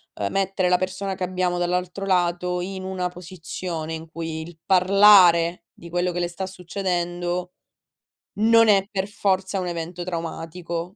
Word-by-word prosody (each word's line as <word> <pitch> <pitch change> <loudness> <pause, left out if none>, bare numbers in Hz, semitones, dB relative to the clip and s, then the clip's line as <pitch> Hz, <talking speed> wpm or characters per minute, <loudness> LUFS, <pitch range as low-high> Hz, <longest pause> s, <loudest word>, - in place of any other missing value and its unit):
uhm, 100 -1 -2
mettere 195 -1 0
la 180 - +4
persona 190 +1 -3
che 185 - -5
abbiamo 180 -1 -1
dall'altro 180 +2 -2
lato, 180 -1 +1
in 190 +1 -5
una 185 -1 -2
posizione 170 -2 -6
in 160 0 -6
cui 165 -1 -5
il 165 0 -11
parlare 185 -3 +6
di 170 - -12
quello 175 +1 0
che 175 - -3
le 175 - 0
sta 175 +2 -5
succedendo, 180 -1 -3 0.8
non 230 +1 +5
è 195 -1 +4
per 195 -2 -2
forza 195 -1 -1
un 180 - -3
evento 175 +1 -5
traumatico. 165 0 -4
180 Hz, 155 wpm, -23 LUFS, 175-190 Hz, 0.8 s, parlare